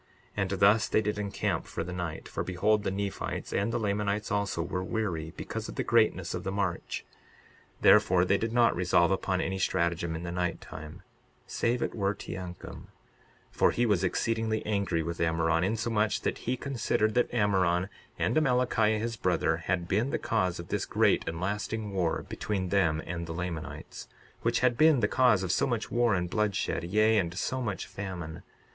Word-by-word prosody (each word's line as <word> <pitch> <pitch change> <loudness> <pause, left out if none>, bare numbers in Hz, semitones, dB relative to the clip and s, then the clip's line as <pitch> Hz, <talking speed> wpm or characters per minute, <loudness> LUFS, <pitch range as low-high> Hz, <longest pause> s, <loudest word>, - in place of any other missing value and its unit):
62:35 105 - -1
And 95 - 0
thus 105 +3 +5
they - - +2
did 105 0 -2
encamp 100 -1 -2
for - - -4
the 90 +2 -6
night. 85 -3 -4
For - - -3
behold, 105 +4 +1
the - - -1
Nephites 100 0 -4
and 100 +3 0
the - - 0
Lamanites 105 -1 -1
also 100 -5 0
were 90 +1 -3
weary 90 -7 -2
because - - -5
of - - -7
the - - -1
greatness - - +2
of - - -4
the 95 - -2
march; 100 -3 -2 0.8
therefore 95 -4 +5
they 100 +2 +2
did 115 0 -2
not 120 0 +4
resolve 90 0 +3
upon 95 -1 0
any 95 0 -2
stratagem 85 -2 0
in 80 - -5
the 85 - -4
night 90 -1 -1
time, 80 +5 -10 0.4
save 120 +1 0
it - - -2
were 100 -1 0
Teancum; 90 -2 -8 0.6
for - - +3
he 120 - +1
was 100 -5 +2
exceedingly 110 +3 0
angry 100 -6 0
with 85 +1 -4
Ammoron, 85 0 +2
insomuch 110 +1 0
that - - -2
he 130 - +1
considered 120 -5 0
that 120 +1 +2
Ammoron, 95 -5 +2 0.3
and 115 - 0
Amalickiah 125 -6 +2
his 115 +2 -2
brother, 85 -4 +1
had 85 +1 -2
been 105 +8 +1
the - - 0
cause 95 -6 0
of 85 - -8
this - - -1
great - - +2
and 80 0 -5
lasting 105 +2 -3
war 90 -4 0
between 95 -3 -3
them 85 -6 +2
and 85 -1 -4
the 80 - -4
Lamanites, 85 -3 -6 0.3
which 115 0 +1
had 125 -1 +2
been 155 -5 +6
the 105 - +3
cause 120 -5 +3
of 90 - -1
so - - +2
much 120 -4 -2
war 120 -3 +3
and 90 -1 -1
bloodshed, 105 -2 -1
yea, 110 +4 +3
and 90 -1 -2
so 130 +6 -1
much 105 -6 -3
famine. 90 -5 -6
100 Hz, 190 wpm, -29 LUFS, 90-110 Hz, 0.8 s, been